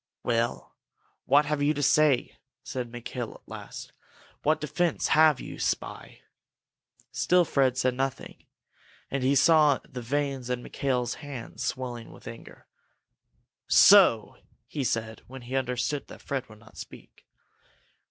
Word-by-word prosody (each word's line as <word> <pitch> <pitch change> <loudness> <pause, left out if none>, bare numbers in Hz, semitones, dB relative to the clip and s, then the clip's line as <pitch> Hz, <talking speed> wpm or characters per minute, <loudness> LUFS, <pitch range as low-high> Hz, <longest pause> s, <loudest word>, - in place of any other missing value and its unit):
"Well, 115 0 -1 0.5
what 145 +3 +4
have 150 -1 -1
you 150 +2 +2
to 145 - -2
say?" 150 -2 +2 0.2
said 125 -2 -5
Mikail, 120 0 -6
at - - -19
last. - - -9 0.5
"What 155 +2 +2
defence 165 +2 -1
have 155 -3 +5
you, - - -8
spy?" - - -4 0.9
Still 180 -1 +3
Fred 130 -4 +1
said 130 -1 +1
nothing, 135 +1 -4 0.7
and 140 - -1
he 135 +2 +2
saw 150 -1 +5
the 125 - -7
veins 135 0 -2
in 125 -1 -2
Mikail's 125 -3 -1
hands 135 -6 -7
swelling 120 -3 -4
with - - -14
anger. 115 - -11 1.0
"So?" - - +6 0.3
he 145 - -4
said, 115 -2 -2
when 130 0 -10
he 125 +2 -6
understood 130 +2 -2
that - - -13
Fred 130 -3 -4
would 110 - -14
not 105 0 -19
speak. - - -12
130 Hz, 135 wpm, -27 LUFS, 120-145 Hz, 1.0 s, So